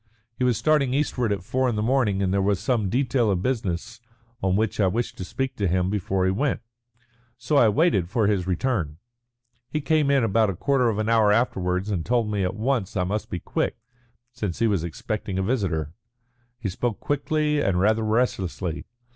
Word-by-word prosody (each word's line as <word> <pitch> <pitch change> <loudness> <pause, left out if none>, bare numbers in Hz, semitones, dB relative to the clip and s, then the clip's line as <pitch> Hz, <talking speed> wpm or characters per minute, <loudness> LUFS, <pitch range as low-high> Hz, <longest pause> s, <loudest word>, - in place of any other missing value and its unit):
He 125 - -3
was 125 -3 +2
starting 140 -3 +2
eastward 125 -6 0
at 100 -3 -2
four 130 +6 0
in 120 - -1
the 105 - -1
morning, 110 -6 +1
and 95 0 0
there 100 - +2
was 100 -1 +1
some 115 -7 0
detail 125 -1 +1
of 95 -2 0
business 115 -2 -2 0.4
on 95 -1 +1
which 110 0 0
I 100 - +4
wished 115 +6 -2
to - - -3
speak 130 +7 -3
to 100 - 0
him 90 +1 +1
before 95 -2 0
he 95 - +2
went. 135 +8 0 0.8
So 130 +4 0
I 115 - +6
waited 105 - +2
for 110 +2 +1
his 100 -3 +1
return. 90 - -1 0.7
He 150 - -1
came 150 0 +2
in 140 -3 +3
about 110 0 +2
a 95 - -3
quarter 130 - +2
of 105 - -1
an 110 0 -1
hour 110 -2 +4
afterwards 95 -3 0
and 90 -5 -1
told 115 -1 0
me 105 -1 -1
at 90 - -1
once 110 -3 -1
that 95 - 0
I - - +2
must 105 +4 -3
be 90 - -3
quick, - - -2 0.5
since 105 -8 -4
he 115 - +1
was 100 -7 +1
expecting 95 +3 -4
a 95 - 0
visitor. 95 - -1 0.6
He 115 -5 -3
spoke 110 +4 -2
quickly 150 +1 0
and 95 -6 +1
rather 110 +4 +3
restlessly. 100 -6 -1
110 Hz, 205 wpm, -24 LUFS, 95-125 Hz, 0.8 s, I